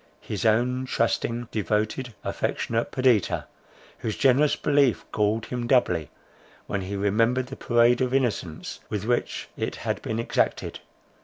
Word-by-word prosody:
—his - - -2
own 125 +4 +2
trusting, 120 -1 0
devoted, 110 +3 -1
affectionate 115 0 -1
Perdita, 130 -7 +2 0.5
whose 110 - -3
generous 135 +3 +4
belief 140 -4 +2
galled 105 +1 +1
him 120 -1 -3
doubly, 90 - +2 0.6
when 100 - -2
he 95 +2 -4
remembered 115 +6 +2
the 135 +1 -8
parade 120 +1 +3
of 125 -1 +1
innocence 120 -11 -1
with 105 -1 -3
which 120 +1 -1
it - - -3
had - - -3
been 110 - -3
exacted. 115 - -1
115 Hz, 135 wpm, -26 LUFS, 105-125 Hz, 0.6 s, generous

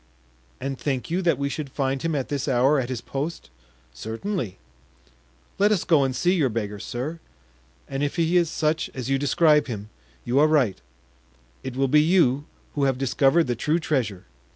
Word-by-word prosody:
"And 135 0 -4
think 135 +1 -2
you 180 +2 +1
that 175 -2 +2
we 140 - -1
should 140 0 -4
find 135 -1 -1
him 165 -2 -1
at 135 -3 -2
this 140 -1 -2
hour 135 +2 +3
at 125 -1 -3
his 125 -3 -3
post?" 140 - -5 0.4
"Certainly." 115 - -4 1.0
"Let 205 +2 +4
us 200 -6 +2
go 155 -5 +4
and 130 -1 -1
see 180 +5 +2
your 155 -8 +2
beggar, 105 -2 -3
sir, 135 +11 -5 0.7
and 135 0 -4
if 145 -1 -1
he 170 0 +1
is 170 -2 +4
such 160 0 0
as 130 0 -4
you 135 - +2
describe 150 +1 +3
him, 105 -3 -6 0.3
you 125 +3 +2
are 150 - +6
right—it 65 - -4
will 135 +1 +2
be 150 +3 +5
you 150 -5 +3 0.3
who 140 -2 +1
have 135 -2 +1
discovered 135 +5 +3
the 120 - -1
true 150 +8 +1
treasure." 120 - -2
135 Hz, 180 wpm, -24 LUFS, 120-155 Hz, 1.0 s, are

